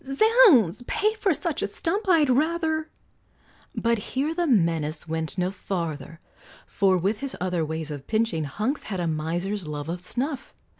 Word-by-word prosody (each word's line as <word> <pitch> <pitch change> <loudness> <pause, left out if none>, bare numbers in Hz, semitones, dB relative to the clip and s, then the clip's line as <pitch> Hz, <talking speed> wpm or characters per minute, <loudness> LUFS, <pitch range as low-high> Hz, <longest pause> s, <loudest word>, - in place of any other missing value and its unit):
"Zounds! 275 - +5
pay 425 +1 +1
for 425 -3 0
such 330 0 -2
a - - 0
stump! 390 +4 -2
I'd 325 -5 +5
rather 315 +3 0 0.4
" - - -31
But 230 -1 +3 0.2
here 290 +5 0
the 345 0 0
menace 165 - +1
went 160 +2 -3
no 180 0 0
farther, 165 -5 -5 0.5
For 190 -2 +2
with 200 +5 0
his 275 -1 -3
other 180 -2 -1
ways 160 0 -4
of 140 -2 -7
pinching, 215 -8 0
Hunks 215 - -2
had 195 -4 -4
a 175 - -1
miser's 170 +4 -2
love 150 0 -5
of 175 +1 -3
snuff. 265 - -4
205 Hz, 165 wpm, -25 LUFS, -, 0.5 s, Zounds